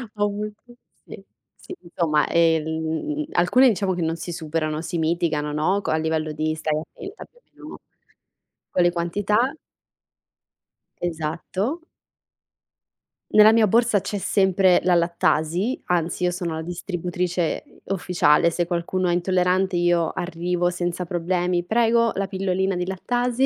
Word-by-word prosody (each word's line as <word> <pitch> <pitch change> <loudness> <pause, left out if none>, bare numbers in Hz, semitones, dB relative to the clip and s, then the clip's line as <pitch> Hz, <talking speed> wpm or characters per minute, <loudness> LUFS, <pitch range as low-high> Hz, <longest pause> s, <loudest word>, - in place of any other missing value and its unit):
Ho 205 - 0
avuto 210 +1 -5 0.4
sì, - - -11 0.3
sì, 370 - -10
insomma, 165 -4 0
ehm, 160 - 0
alcune 250 +10 +4
diciamo 195 -4 0
che 175 - -3
non 165 0 -1
si 170 +1 -6
superano, 155 -2 -3
si 170 0 -3
mitigano, 160 -2 0
no, 160 +7 0
c - - -4
a - - +2
livello 160 -1 -1
di 155 +1 -1
stai 155 -1 -2
attenta 390 - -10
più 485 - -27
o - - -40
meno, - - -13
no, - - -10 0.9
con 180 - +2
le 175 - +4
quantità 205 +8 0 1.5
Esatto. 175 - -3 1.5
Nella 215 +1 +8
mia 225 -1 +5
borsa 225 0 +3
c'è 205 - -4
sempre 190 -2 +3
la 180 - +3
lattasi, 170 +5 +1
anzi 175 0 -1
io 180 - +2
sono 175 -2 -3
la 160 - -4
distributrice, 175 0 -3
uhm, - - -22 0.2
ufficiale. 170 -3 +3
Se 175 +1 -1
qualcuno 175 +1 -1
è 175 - +2
intollerante 180 +1 +1
io 175 -1 +2
arrivo 175 0 -1
senza 175 0 -3
problemi: 175 0 -1
"Prego, 230 +3 +2
la 195 0 -1
pillolina 190 0 -1
di 180 0 -2
lattasi"; 245 +7 0
175 Hz, 145 wpm, -23 LUFS, 165-195 Hz, 1.5 s, Nella